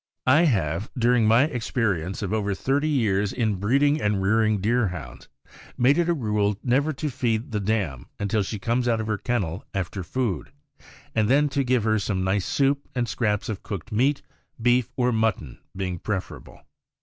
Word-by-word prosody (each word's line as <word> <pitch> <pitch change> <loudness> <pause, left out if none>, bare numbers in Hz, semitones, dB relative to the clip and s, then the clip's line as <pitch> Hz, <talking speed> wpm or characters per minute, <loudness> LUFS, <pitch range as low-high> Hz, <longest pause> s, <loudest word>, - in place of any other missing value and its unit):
I 145 +7 +5
have, 95 - 0
during 120 -2 +3
my 115 +4 +5
experience 110 - -1
of 100 +1 -2
over 100 -2 0
thirty 140 +8 0
years 105 -8 +1
in 110 -5 0
breeding 140 +9 +2
and 105 -1 +1
rearing 110 +2 +2
Deerhounds, 90 - -2 0.5
made 135 +6 +4
it 170 0 +1
a 170 - +2
rule 105 -6 0
never 135 +5 +2
to 150 +1 -3
feed 120 -3 -1
the 105 - -1
dam 95 - -2
until 105 +1 0
she 105 +2 -3
comes 120 +5 0
out 115 -2 +2
of 110 - -2
her 110 -2 -2
kennel 100 -7 -2
after 95 0 -3
food, 100 - -2 0.6
and 110 -1 +1
then 145 +3 +4
to 140 0 0
give 125 -3 +1
her 110 0 +2
some 100 -2 -1
nice 95 0 0
soup 140 0 +1
and 120 -1 0
scraps 105 -1 -1
of 105 -4 -4
cooked 100 0 -6
meat, 135 +7 +1 0.4
beef 120 +1 +2
or 125 -1 +2
mutton 110 - -1 0.2
being 90 -3 -3
preferable. 95 -1 -5
110 Hz, 175 wpm, -25 LUFS, 100-125 Hz, 0.6 s, I